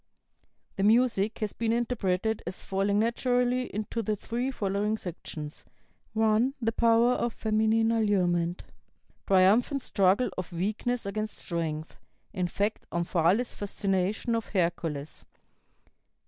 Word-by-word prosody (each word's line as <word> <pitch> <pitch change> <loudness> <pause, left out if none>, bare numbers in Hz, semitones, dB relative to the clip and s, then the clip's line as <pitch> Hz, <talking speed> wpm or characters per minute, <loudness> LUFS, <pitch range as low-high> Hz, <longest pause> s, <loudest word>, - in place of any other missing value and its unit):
The 195 - 0
music 225 -1 +3
has 210 -2 -1
been 230 -1 -1
interpreted 220 -3 0
as 185 - -5
falling 195 +1 0
naturally 245 +2 +1
into 215 +3 -3
the 215 0 -1
three 240 +5 -3
following 210 -2 -1
sections: 155 -5 -7 0.5
"(1) 220 +4 +2
The 225 -2 0
power 230 +1 +4
of 235 -2 -1
feminine 220 +1 +2
allurement. 180 -6 +1 0.6
Triumphant 210 +8 +4
struggle 195 +5 +2
of 185 0 -5
weakness 215 +7 -2
against 215 +2 -3
strength; 160 -3 -4 0.4
in 185 -3 -1
fact, 205 +4 -2
Omphale's 175 +6 +1
fascination 200 +2 -1
of 230 -1 -1
Hercules. 165 -6 -2
210 Hz, 115 wpm, -28 LUFS, 185-230 Hz, 0.6 s, power